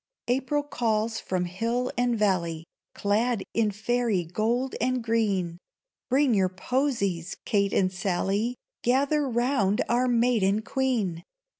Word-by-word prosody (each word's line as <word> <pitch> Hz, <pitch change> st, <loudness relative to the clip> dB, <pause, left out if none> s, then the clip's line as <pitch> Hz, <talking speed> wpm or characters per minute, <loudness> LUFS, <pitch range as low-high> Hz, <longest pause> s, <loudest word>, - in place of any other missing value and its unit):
April 270 Hz, +4 st, 0 dB
calls 225 Hz, -5 st, -1 dB
from 185 Hz, -1 st, -2 dB
hill 230 Hz, +8 st, -1 dB
and 245 Hz, -1 st, +1 dB
valley, 170 Hz, -6 st, 0 dB, 0.3 s
Clad 210 Hz, +1 st, +1 dB
in 225 Hz, -2 st, +2 dB
fairy 220 Hz, -1 st, 0 dB
gold 230 Hz, +9 st, -1 dB
and 255 Hz, -1 st, 0 dB
green; 200 Hz, -7 st, 0 dB, 0.5 s
Bring 265 Hz, 0 st, +3 dB
your 190 Hz, -3 st, +3 dB
posies, 200 Hz, -, -1 dB
Kate 200 Hz, -3 st, +1 dB
and 185 Hz, -1 st, +1 dB
Sally! 195 Hz, +5 st, -1 dB, 0.3 s
Gather 275 Hz, +3 st, +2 dB
round 235 Hz, -4 st, +1 dB
our 245 Hz, +2 st, +2 dB
maiden 230 Hz, -4 st, +2 dB
Queen! 225 Hz, -11 st, -1 dB
225 Hz, 120 wpm, -27 LUFS, 195-245 Hz, 0.5 s, Bring